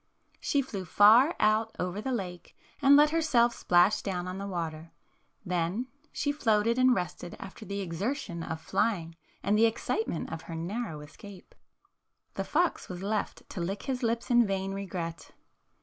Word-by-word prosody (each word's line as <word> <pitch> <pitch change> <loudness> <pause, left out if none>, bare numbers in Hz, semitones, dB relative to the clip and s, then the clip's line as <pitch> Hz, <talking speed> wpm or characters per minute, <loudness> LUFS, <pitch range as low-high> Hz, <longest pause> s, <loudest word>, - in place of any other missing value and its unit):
She 280 -1 +1
flew 205 -7 -5
far 225 - +6
out 215 +1 +2
over 180 +3 -3
the 265 - -3
lake 180 -7 -5 0.2
and 280 0 +7
let 295 +1 +6
her 330 0 +2
self 240 -6 +3
splash 180 +3 +3
down 180 -2 -3
on 185 +1 -5
the 200 - -4
water. 165 -3 -5 0.5
Then 180 +8 -1 0.2
she 285 - -1
floated 230 -4 +2
and 255 -1 +5
rested 180 -1 -4
after 205 +3 -9
the 200 0 -4
exertion 185 - -3
of 160 0 -4
flying 190 -2 -1 0.3
and 205 +2 +2
the 225 +2 +5
excitement 225 -5 -2
of 165 - -5
her 165 - -4
narrow 170 -1 -4
escape. 185 +5 -13 0.8
The - - -2
fox 345 +2 0
was 180 0 -6
left 210 +1 -3
to 180 - -4
lick 195 +4 -3
his 265 -2 -2
lips 235 +1 -1
in 240 -2 +5
vain 195 0 -2
regret. 180 -4 -5
200 Hz, 165 wpm, -29 LUFS, 180-235 Hz, 0.8 s, and